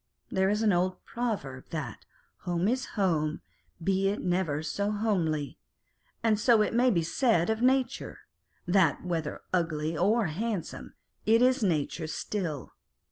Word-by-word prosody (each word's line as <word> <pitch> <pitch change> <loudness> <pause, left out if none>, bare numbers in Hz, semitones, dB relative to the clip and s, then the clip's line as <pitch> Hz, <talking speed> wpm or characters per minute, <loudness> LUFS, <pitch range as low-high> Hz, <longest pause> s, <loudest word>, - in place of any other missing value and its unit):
There 190 0 +2
is 210 +2 +1
an 210 -3 +4
old 180 +1 0
proverb, 200 - -3
that 155 -3 -6 0.2
" - - -41
Home 175 +1 0
is 255 +3 0
home, 160 -6 +1 0.4
be 195 +2 +2
it 205 - -2
never 175 -5 0
so 200 +6 -1
homely 180 -9 -1 0.3
:" - - -42
and 220 -2 +3
so 225 -1 +5
it - - -2
may 245 +2 +4
be 170 -8 +2
said 220 +1 +2
of 220 +1 -2
nature; 260 0 +1 0.4
that 180 -3 +2
whether 165 -4 -3
ugly 165 -2 0
or 210 +7 +2
handsome, 195 +3 -4 0.3
it 225 +2 +5
is 255 +1 +3
nature 160 -3 0
still. 160 -4 -4
190 Hz, 150 wpm, -29 LUFS, 160-220 Hz, 0.4 s, so